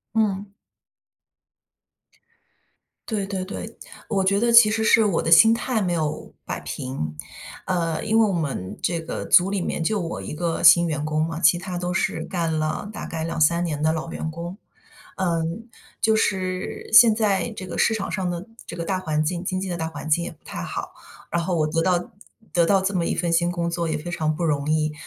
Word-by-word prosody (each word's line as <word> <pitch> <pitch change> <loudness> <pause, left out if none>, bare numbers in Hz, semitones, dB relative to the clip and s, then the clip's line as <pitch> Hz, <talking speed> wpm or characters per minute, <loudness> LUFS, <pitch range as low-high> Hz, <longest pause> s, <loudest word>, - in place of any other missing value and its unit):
嗯。 205 -2 0 2.6
对 210 -3 -1
对 195 -2 -4
对。 215 +3 -7 0.3
我 195 -4 0
觉 195 +1 +2
得 235 +2 +2
其 230 -2 +8
实 220 +1 0
是 225 +1 +5
我 200 -6 +1
的 165 - -2
心 195 +7 +8
态 230 0 0
没 180 -3 0
有 155 -2 -3
摆 - - -4
平。 80 - -5 0.5
嗯， 165 -3 -1
因 220 +1 +3
为 - - +6
我 - - 0
们 140 - -3
这 170 -1 0
个 160 - -5
组 180 +2 +5
里 200 -1 -1
面 165 - -2
就 210 +5 0
我 170 -2 -4
一 - - -7
个 165 +1 -2
新 170 +2 +7
员 155 -2 -2
工 155 0 0
嘛， 165 0 -5
其 175 - +5
他 180 +1 -6
都 180 0 -2
是 180 - -1
干 170 -4 -2
了 155 +6 -2
大 - - -6
概 160 -1 -4
2-3 165 +1 +2
年 150 -4 -3
的 155 +1 +3
老 160 +1 -4
员 160 - -4
工。 170 +3 -6 0.6
嗯， 170 +4 -2 0.3
就 220 0 +3
是 185 -3 -2
现 225 0 +9
在 215 0 +1
这 190 - -7
个 170 -2 -6
市 - - +3
场 220 -3 -3
上 185 -3 -2
的 175 +2 -5 0.2
这 - - -7
个 170 -1 -5
大 190 -2 0
环 155 -4 -1
境， 175 +3 -2
经 185 0 -2
济 190 - -4
的 175 - -3
大 165 -1 -3
环 155 -1 -7
境 170 +2 +2
也 - - -5
不 155 - -23
太 - - -7
好。 - - -5 0.4
然 170 - 0
后 180 +1 -1
我 155 -2 +2
得 165 +2 0
到 180 0 0 0.4
得 170 - +3
到 195 +2 +4
这 190 +1 -1
么 175 -2 +1
一 - - 0
份 175 - -1
新 175 +1 +2
工 170 -1 -2
作 170 0 -2
也 155 - -1
非 165 +4 -6
常 155 -3 -1
不 170 - -5
容 145 -3 0
易， 155 -1 +1
175 Hz, 225 characters per minute, -23 LUFS, 160-195 Hz, 2.6 s, 现